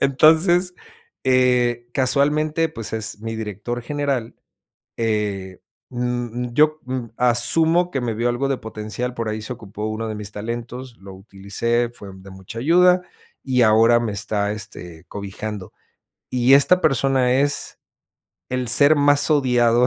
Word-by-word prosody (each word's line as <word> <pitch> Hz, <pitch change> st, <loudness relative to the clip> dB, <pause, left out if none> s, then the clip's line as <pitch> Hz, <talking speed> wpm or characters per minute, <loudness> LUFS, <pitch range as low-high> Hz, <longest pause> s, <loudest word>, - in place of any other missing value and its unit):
entonces, 165 Hz, +6 st, +3 dB, 0.5 s
eh, 125 Hz, -2 st, +2 dB
casualmente, 150 Hz, +4 st, +1 dB
pues, 115 Hz, -8 st, -6 dB
es 105 Hz, -1 st, -3 dB
mi 115 Hz, 0 st, -5 dB
director 110 Hz, +3 st, -5 dB
general, 140 Hz, -3 st, -2 dB, 0.6 s
eh, 105 Hz, -4 st, -2 dB, 0.3 s
mm, 125 Hz, -1 st, -3 dB
yo 155 Hz, +1 st, +3 dB
mm, 130 Hz, -2 st, -4 dB
asumo 160 Hz, +9 st, +2 dB
que 135 Hz, -, -2 dB
me 120 Hz, -2 st, -2 dB
vio 120 Hz, +3 st, 0 dB
algo 120 Hz, +3 st, -1 dB
de 135 Hz, -, 0 dB
potencial, 110 Hz, +3 st, -5 dB
por 115 Hz, -2 st, -3 dB
ahí 110 Hz, 0 st, -4 dB
se 105 Hz, -, -5 dB
ocupó 105 Hz, -2 st, -7 dB
uno 110 Hz, +1 st, -4 dB
de 110 Hz, -, -4 dB
mis 105 Hz, 0 st, -6 dB
talentos, 120 Hz, +3 st, -6 dB
lo 95 Hz, 0 st, -12 dB
utilicé, 100 Hz, +5 st, -2 dB
fue 100 Hz, -4 st, -11 dB
de 95 Hz, +1 st, -13 dB
mucha 95 Hz, +4 st, -10 dB
ayuda 180 Hz, +6 st, +4 dB, 0.4 s
y 125 Hz, -2 st, +2 dB
ahora 115 Hz, +2 st, +5 dB
me 115 Hz, -3 st, -2 dB
está, 100 Hz, 0 st, -1 dB
este, 90 Hz, -5 st, -9 dB
cobijando, 100 Hz, 0 st, -7 dB, 0.6 s
y 125 Hz, +1 st, +3 dB
esta 180 Hz, +6 st, +4 dB
persona 135 Hz, -3 st, +2 dB
es 145 Hz, +1 st, -1 dB, 0.7 s
el 125 Hz, -1 st, -2 dB
ser 145 Hz, +5 st, +6 dB
más 145 Hz, 0 st, +3 dB
odiado 125 Hz, -4 st, +3 dB
120 Hz, 140 wpm, -21 LUFS, 110-135 Hz, 0.7 s, ser